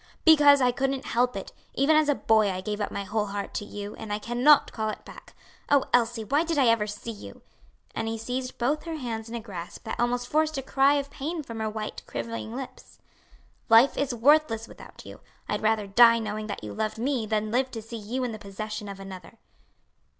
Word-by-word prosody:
"Because 290 -3 +7
I 250 -1 +4
couldn't 270 +2 -2
help 245 +2 +1
it! - - -6 0.2
Even 290 +3 +3
as 310 -1 +4
a 290 - +3
boy 220 -4 +3
I 185 -1 -3
gave 210 +2 -4
up 205 - -1
my 200 - -3
whole 210 +2 -1
heart 200 0 -5
to 205 - -3
you, 205 0 -7
and 220 -2 -7
I 205 - 0
cannot 245 +7 +4
call 220 -1 -2
it - - -7
back. - - -13 0.3
Oh, 285 -2 +4
Elsie, 235 -1 +2
why 285 +9 +1
did 330 -2 -2
I 275 - +4
ever 225 -2 +2
see 210 +2 -6
you?" 210 - -11 0.5
and 225 - -3
he 225 0 -2
seized 250 +3 -4
both 285 +7 0
her 330 -1 -4
hands 230 -6 -5
in 235 - -6
a - - -2
grasp 190 -6 -8
that 220 - -5
almost 245 +1 0
forced 310 +1 +1
a 270 - -3
cry 275 +1 +3
of 280 -1 -2
pain 310 +4 -4
from 230 -4 -7
her 220 0 -1
white, 215 0 -5
quivering 230 0 -5
lips. 255 -1 -9 0.7
"Life 230 +4 +6
is 280 -2 -1
worthless 240 -2 +3
without - - -13
you. - - -11 0.3
I'd - - -2
rather 220 -1 +1
die 230 +4 +6
knowing 215 -1 -4
that 205 - -6
you 105 -1 -6
loved 215 - -2
me 245 -1 -1
than 215 0 -1
live 260 +2 +1
to 225 -3 -6
see 230 +1 -7
you 240 +5 -3
in 245 - -2
the 215 - -7
possession 210 +1 -6
of 195 -1 -8
another." 190 +2 -10
230 Hz, 225 wpm, -26 LUFS, 215-270 Hz, 0.7 s, Because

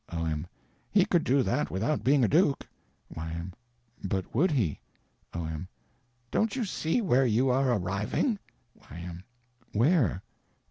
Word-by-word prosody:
O.M. 80 -1 -2 0.4
He 195 -3 +4
could 175 -5 +2
do 135 +1 +3
that 150 - 0
without 115 +11 -1
being 135 0 +4
a - - +5
duke. 150 - +2 0.5
Y.M. 85 +3 -5 0.5
But 95 -1 -2
would 165 +11 +3
he? 115 - 0 0.5
O.M. 80 +1 -4 0.6
Don't 220 +1 +1
you 250 -4 0
see 180 +3 0
where 135 - +3
you 120 +4 +3
are 130 0 +3
arriving? 105 - 0 0.5
Y.M. 85 +2 -8 0.5
Where? 120 - +3
120 Hz, 130 wpm, -29 LUFS, -, 0.6 s, a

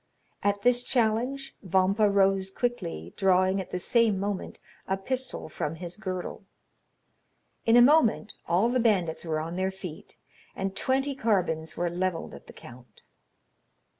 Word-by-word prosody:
At 205 0 0
this 245 0 +4
challenge, 245 +3 0
Vampa 195 +2 +2
rose 195 -1 +2
quickly, 85 - -3
drawing 190 0 +3
at 185 - -9
the - - -3
same 220 +1 +2
moment 200 -1 -4 0.3
a 190 - 0
pistol 255 +6 -3
from 155 0 -4
his 175 +1 -7
girdle. 185 -1 -5 1.2
In 230 +1 +6
a 240 - +9
moment 245 -6 +4
all 185 +7 +3
the 250 +1 +1
bandits 185 -9 +1
were 155 -2 -1
on 165 +3 -5
their 190 0 0
feet, 190 -4 -9 0.4
and 195 0 -3
twenty 270 +5 0
carbines 185 -10 -1
were 175 - 0
levelled 175 0 -2
at - - -12
the - - -12
count. 120 -3 -15
195 Hz, 145 wpm, -27 LUFS, 175-230 Hz, 1.2 s, a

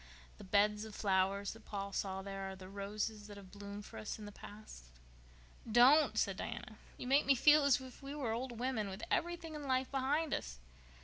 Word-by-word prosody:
The - - -9
beds 210 +2 +2
of 220 -1 -8
flowers 195 0 +1
that 225 0 -15
Paul 200 -1 -4
saw 190 -1 -2
there 195 -1 -5
are 190 - -6
the 185 -1 -10
roses 205 +2 -4
that 205 -1 -10
have 190 -2 -12
bloomed 205 0 -8
for - - -9
us 110 - -5
in 215 - -9
the 205 - -8
past?" 205 - -11 0.9
"Don't!" 260 +7 +6
said - - +1
Diana. - - -6 0.2
"You - - -6
make 270 +3 +3
me 275 - +6
feel 295 +4 +6
as 280 -1 +5
if 260 +1 -11
we 275 +1 -6
were 265 -7 -2
old 240 +1 -3
women 235 -4 -1
with 195 +3 -7
everything 340 -2 -1
in 295 -2 -6
life 260 0 +1
behind 280 +3 +1
us." - - -3
215 Hz, 205 wpm, -36 LUFS, 200-265 Hz, 0.9 s, Don't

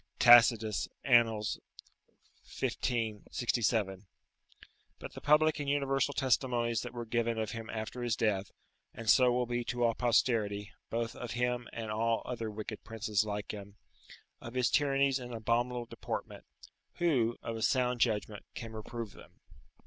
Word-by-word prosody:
[Tacitus, 115 -3 +6 0.2
Annal., 115 -4 +4 1.0
xv. 110 -4 -2
67.] 110 -5 0 0.9
But - - -9
the - - -9
public 150 +1 +4
and 145 -1 -2
universal 140 -1 +1
testimonies 120 -3 +1
that 125 0 -7
were 120 -1 -4
given 115 0 0
of 110 -1 -2
him 115 -1 -7
after 110 +3 -5
his 120 -2 0
death 100 -4 0 0.5
(and 115 - -8
so 125 +3 +6
will 125 0 +1
be 120 0 -2
to 120 0 -1
all 115 -1 +3
posterity, 110 -4 +1 0.2
both 115 0 -2
of 125 - -6
him 125 0 -1
and 115 -1 -5
all 115 +1 0
other 115 -3 -4
wicked 110 0 -7
princes 110 -2 -1
like 105 -1 -4
him), 100 -1 -9 0.7
of 120 +1 -9
his 125 -2 +2
tyrannies 140 -2 +2
and 125 -1 -7
abominable 120 +2 0
deportment, - - -6 0.5
who, 130 -10 +1
of 115 - -4
a 110 - -5
sound 125 0 +1
judgment, 105 -2 0
can 115 -2 -7
reprove 110 0 -6
them? - - -16
115 Hz, 150 wpm, -32 LUFS, 110-125 Hz, 1.0 s, Tacitus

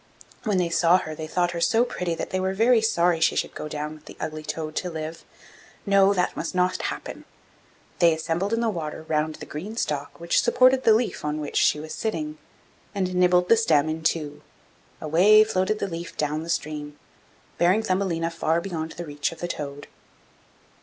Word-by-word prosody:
When 210 -3 +1
they 175 -2 +1
saw 170 +1 +4
her, 155 -4 -5
they 155 0 -6
thought 175 +1 0
her 170 -1 -4
so 230 +7 +3
pretty 180 -8 -3
that - - -5
they 185 - 0
were 190 +1 -1
very 230 +2 +4
sorry 175 -6 +2
she 160 - +3
should - - -1
go - - -6
down 150 0 -4
with 155 0 -15
the - - -12
ugly 155 0 -4
toad 155 0 -5
to 180 - -1
live. 160 0 -6 0.6
No; 200 -1 +5
that 180 -3 0
must 165 - -4
not 180 0 +1
happen. - - -5 0.8
They 170 -2 +6
assembled 165 +5 -1
in 230 0 +1
the 230 - +1
water 160 -4 -5
round 155 0 0
the - - -9
green 200 +10 -7
stalk 145 -7 -3
which 170 0 +2
supported 255 +1 +4
the 220 - +7
leaf 235 +1 -1
on 150 0 -2
which 150 - -4
she 150 - +3
was 155 +1 -7
sitting, 305 +8 -3 0.6
and 185 -2 -1
nibbled 180 0 +3
the 230 - +6
stem 155 -10 +3
in 160 +1 -3
two. 155 -2 -1 0.6
Away 185 +8 +5
floated 215 0 0
the 200 - -2
leaf 170 -1 -7
down 150 +1 -1
the 165 - -8
stream, 150 -2 -3 0.6
bearing 185 +6 +3
Thumbelina 185 -4 0
far 165 0 0
beyond 165 -3 -5
the 175 - -7
reach 145 -1 -2
of 165 - -10
the 175 - -3
toad. 145 -3 -6
170 Hz, 200 wpm, -25 LUFS, 155-195 Hz, 0.8 s, the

